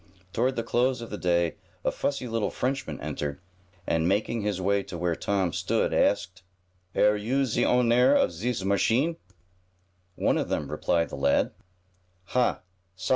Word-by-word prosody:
Toward 130 +3 +1
the 115 - -1
close 125 +2 +1
of 115 - -8
the 105 - -4
day 85 -2 +1 0.3
a - - +3
fussy 140 -3 -2
little 115 -2 -1
Frenchman 135 +2 -3
entered, 75 +1 -4 0.5
and, 80 0 +1
making 105 +4 0
his 105 -2 -1
way 100 +2 +2
to 90 - -7
where 85 0 0
Tom 95 -1 0
stood, - - 0
asked: 95 -3 +1 0.5
"Air 105 0 +4
you 125 +7 0
ze 120 -1 0
ownair 125 +3 +4
of - - +3
zis 105 +5 -2
machine?" 120 - +2 1.0
"One - - +1
of - - -2
them," - - -2
replied 85 -1 0
the - - -6
lad. 70 0 +2 0.8
"Ha! 125 -1 +2
105 Hz, 155 wpm, -27 LUFS, 90-125 Hz, 1.0 s, Air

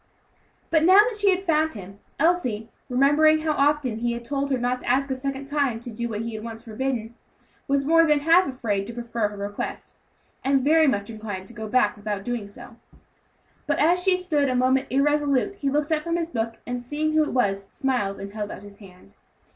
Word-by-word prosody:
But 320 -2 +4
now 370 +4 +7
that 430 +2 +5
she 410 -1 +3
had 380 0 +1
found 315 -3 +1
him, 195 0 -10 0.2
Elsie, 255 -10 +1 0.2
remembering 295 +5 +4
how 315 0 0
often 285 -5 +1
he 240 0 -1
had 235 0 -7
told 280 +2 -2
her 265 - +1
never 245 +1 -1
to - - -5
ask 270 +2 +1
a - - 0
second 275 +1 -4
time 280 -5 0
to 240 +1 -8
do 235 +2 -4
what 215 -1 -3
he 230 0 -5
had 215 0 -6
once 225 0 -8
forbidden, 235 0 -3 0.5
was 275 0 +1
more 330 +2 +5
than 300 -1 +3
half 335 +5 +5
afraid 220 -7 -2
to 235 - -8
prefer 235 -2 -2
her 205 0 -9
request, 200 +1 -6 0.4
and 270 -1 +2
very 315 +2 +4
much 205 -4 0
inclined 210 -4 -6
to 235 - -12
go 220 -2 -6
back 210 -2 +2
without 205 -1 -4
doing 240 -2 -3
so. 235 +2 -12 0.9
But - - +1
as 350 +3 +3
she 370 0 +3
stood 300 -6 0
a 255 - 0
moment 260 +2 +2
irresolute, 290 +5 +1
he 280 - -1
looked 295 +2 0
up 310 -1 +2
from 335 +1 -2
his 335 0 -3
book, 230 -2 -2
and 245 0 -4
seeing 300 +5 -2
who 310 - +4
it - - -4
was, 200 -6 0
smiled 240 -7 -2
and 200 +1 -8
held 210 -1 -4
out 195 - -8
his 200 0 -13
hand. 180 - -16
255 Hz, 220 wpm, -24 LUFS, 220-300 Hz, 0.9 s, now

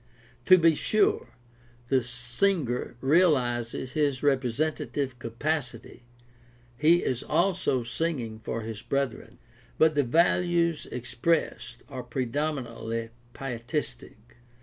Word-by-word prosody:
To 185 - +8
be 165 -2 +5
sure, 215 +7 +2 0.6
the 130 -2 +3
singer 125 - -1
realizes 130 -6 +2
his 145 -4 0
representative 135 0 0
capacity 120 0 -3 0.4
— - - -28 0.3
he 160 +6 +4
is 125 -2 -1
also 175 -9 +1
singing 120 -4 -2
for 115 +1 -4
his 110 -2 -6
brethren. 140 -4 -3 0.4
But 160 0 +5
the 145 - +3
values 170 +3 +2
expressed 125 +7 -2
are 130 - -6
pre 125 +1 -3
dominantly 115 -4 -3 0.2
pietistic. 120 -3 -5
130 Hz, 105 wpm, -27 LUFS, 120-160 Hz, 0.6 s, To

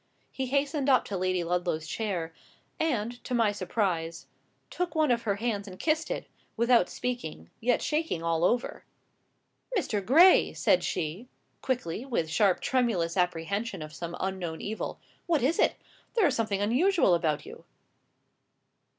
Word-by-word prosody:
He 265 -1 -3
hastened 280 +1 0
up 260 - +4
to 200 - -4
Lady 185 -1 0
Ludlow's 175 -2 -1
chair, 170 -2 -3 0.5
and, 245 -6 -1
to 250 - -2
my 225 -3 +3
surprise, 180 -4 -2 0.5
took 355 -1 -3
one 310 -4 +3
of 235 -1 +2
her 200 - +2
hands 205 -2 -2
and 185 -1 -9
kissed 315 - 0
it, - - -3 0.3
without 235 -4 +4
speaking, 230 - -5
yet 245 +1 +1
shaking 305 - -1
all 165 0 0
over. 240 +7 0 0.9
"Mr. 210 - -1
Gray!" 330 - +6
said - - +3
she, 175 +11 -3 0.3
quickly, 240 -6 -2
with 200 - -2
sharp, 190 +3 +3
tremulous 215 -10 +1
apprehension 180 +2 -1
of 155 0 -10
some 170 +1 -6
unknown 185 -4 -3
evil. 220 +2 -4 0.3
"What 325 -7 +2
is 295 +6 +1
it? - - +3 0.4
There 445 -5 +4
is 290 - +3
something 210 -4 -1
unusual 260 - +3
about 160 -3 0
you." - - -11
210 Hz, 150 wpm, -28 LUFS, 175-255 Hz, 0.9 s, Gray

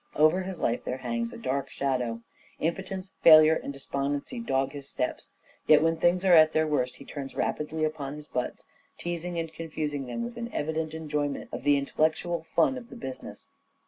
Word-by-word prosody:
Over 155 +5 +4
his 185 -1 -5
life 120 - 0
there 125 - -3
hangs 115 -2 -2
a - - -9
dark 135 +1 -2
shadow. 125 -4 -2 0.4
Impotence, 190 +3 -3
failure 155 -1 +9
and 150 - -3
despondency 140 - -3
dog 135 -11 0
his 140 -1 -9
steps. 125 - -3 0.4
Yet, 155 0 +7
when 165 0 +3
things 180 +3 +2
are 185 - +6
at 155 -1 +7
their 155 0 +3
worst 130 -5 0
he 140 - -13
turns 140 -2 -7
rapidly 155 +1 -1
upon 150 -2 -2
his 150 0 -9
butts, 125 -4 -4 0.3
teasing 175 0 -4
and 165 -1 -3
confusing 155 -4 -4
them 235 - -3
with 235 0 -6
an 235 0 -5
evident 160 +1 -2
enjoyment 150 -3 -2
of - - -5
the 145 +2 +4
intellectual 160 +4 0
fun 210 +10 +1
of 240 -1 -15
the - - -10
business. 130 - -8
155 Hz, 185 wpm, -28 LUFS, 140-165 Hz, 0.4 s, failure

